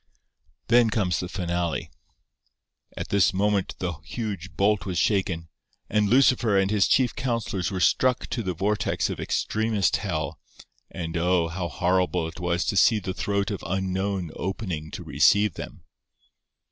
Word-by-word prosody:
Then 120 -1 +5
comes 100 -5 0
the 90 - -4
finale:— 85 -2 -2 1.1
'At - - -5
this 100 -2 +3
moment 100 0 +1
the 90 -2 -2
huge 100 -4 -5
bolt 105 +1 +2
was 95 -3 -3
shaken, 95 -5 0 0.4
and 105 -1 +2
Lucifer 120 -4 +4
and 95 +1 +2
his 105 -2 +3
chief 130 -3 +2
counsellors 115 -8 -2
were 95 - -3
struck 125 +7 +2
to 120 - -1
the 95 -4 -3
vortex 100 +5 0
of - - -6
extremest 110 -3 0
hell, - - -3 0.5
and 80 -1 -5
oh! 85 0 +2
how 90 +1 -3
horrible 90 0 0
it 80 - -10
was 85 0 0
to 100 - 0
see 110 +3 +5
the 95 -2 -4
throat 100 +2 -1
of 100 - -5
Unknown 95 -1 -2
opening 90 -5 -4
to 90 - -7
receive 85 +7 +3
them! - - -9
95 Hz, 150 wpm, -25 LUFS, 90-105 Hz, 1.1 s, Then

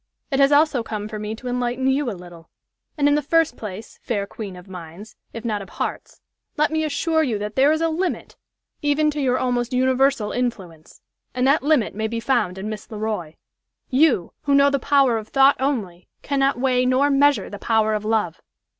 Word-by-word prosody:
It 270 - +1
has 275 +1 +5
also 290 -3 +4
come 215 -2 -5
for 215 0 -6
me 210 +1 -4
to 250 +3 -9
enlighten 245 +1 -2
you 265 0 +1
a 200 - -5
little. 175 -2 -13 0.5
And 290 -1 +3
in 290 - +4
the 295 - +2
first 320 -2 +2
place, 215 0 -9
fair 205 -4 -2
queen 200 -2 -8
of 180 +2 -13
minds, 180 +3 -10 0.2
if 230 +1 -8
not 210 -3 -1
of 195 - -10
hearts, - - -5 0.4
let 300 0 +2
me 315 0 0
assure 315 +2 0
you 245 -9 0
that 210 +1 -5
there 275 +3 +4
is 315 +1 0
a 330 - +2
limit 350 +3 -3 0.5
even 300 +1 +2
to 295 0 -3
your 255 -2 +1
almost 245 0 -1
universal 260 -3 +2
influence. 190 -11 -5 0.3
And 250 0 +1
that 280 +4 +4
limit 290 -5 +2
may 220 +1 -2
be 230 +1 -3
found 230 -7 0
in 195 +2 -5
Miss 215 -1 -7
Le 220 - -7
Roy. 210 -7 -4 0.6
You, 260 - +2
who 280 -1 +3
know 280 0 +5
the 280 - +1
power 270 -4 +3
of 215 - -10
thought 270 +2 +4
only, 215 -11 -2 0.2
cannot 275 -2 +1
weigh 250 -1 +2
nor 270 +3 +3
measure 280 -6 +3
the 205 - -8
power 220 -1 +1
of 210 -1 -2
love. 215 -6 -1
245 Hz, 205 wpm, -22 LUFS, 210-280 Hz, 0.6 s, has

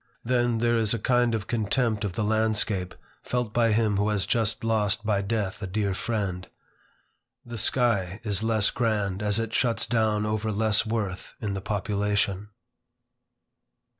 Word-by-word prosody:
Then, 120 -1 +1
there 120 +1 +2
is 110 0 +2
a 110 - -5
kind 120 -2 +3
of 105 -3 -3
contempt 110 -1 0
of 100 -3 -2
the 105 - -2
landscape 105 -3 0 0.3
felt 125 -3 -2
by 115 -2 +3
him 105 -2 +2
who 105 +1 +1
has 105 -3 0
just 115 0 0
lost 110 -2 +1
by 105 -2 +1
death 105 -1 -2
a 100 - -3
dear 100 +1 -1
friend. 95 -4 -3 1.0
The 120 -1 -5
sky 110 -5 +1
is 105 -3 0
less 110 -2 +2
grand 105 -5 -1
as 105 -1 +1
it 115 0 -3
shuts 120 -3 +1
down 110 -2 +1
over 110 +1 -1
less 110 +1 +2
worth 105 -5 -3
in 105 -3 -3
the 95 - -4
population. 100 0 -1
110 Hz, 160 wpm, -26 LUFS, 100-115 Hz, 1.0 s, kind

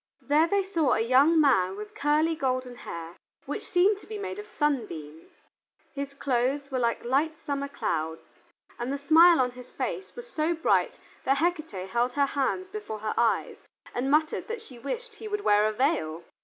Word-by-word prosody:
There 300 +3 +3
they 400 +2 +2
saw 335 -7 +1
a - - +1
young 265 +8 +5
man 195 -11 +3
with 210 0 -8
curly 305 +3 +2
golden 255 -3 -1
hair 170 -7 -8 0.3
which - - -4
seemed 385 +3 +3
to - - -16
be 430 - -5
made 400 0 -5
of 420 - -8
sunbeams. 215 - -3 0.6
His 280 0 -5
clothes 275 +2 0
were 260 - 0
like 235 -1 0
light 295 +6 +1
summer 280 -3 -3
clouds, 160 - -4 0.4
and 240 +2 -2
the 280 - -1
smile 325 +4 +6
on 250 -1 +2
his 250 0 -12
face 385 - -4
was 485 0 -8
so 330 -6 0
bright 325 - +1 0.3
that 270 +1 +2
Hecate 310 - -1
held 240 +3 +1
her 285 -1 +3
hands 285 +7 -1
before 420 - -5
her 215 0 -3
eyes 230 0 +1 0.4
and 255 +2 -1
muttered 310 +2 +1
that 460 -1 -5
she 250 - -13
wished 460 - -5
he 440 - -7
would 415 -1 -2
wear 210 - +4
a 215 - +2
veil! 210 - 0
280 Hz, 185 wpm, -27 LUFS, 240-330 Hz, 0.6 s, smile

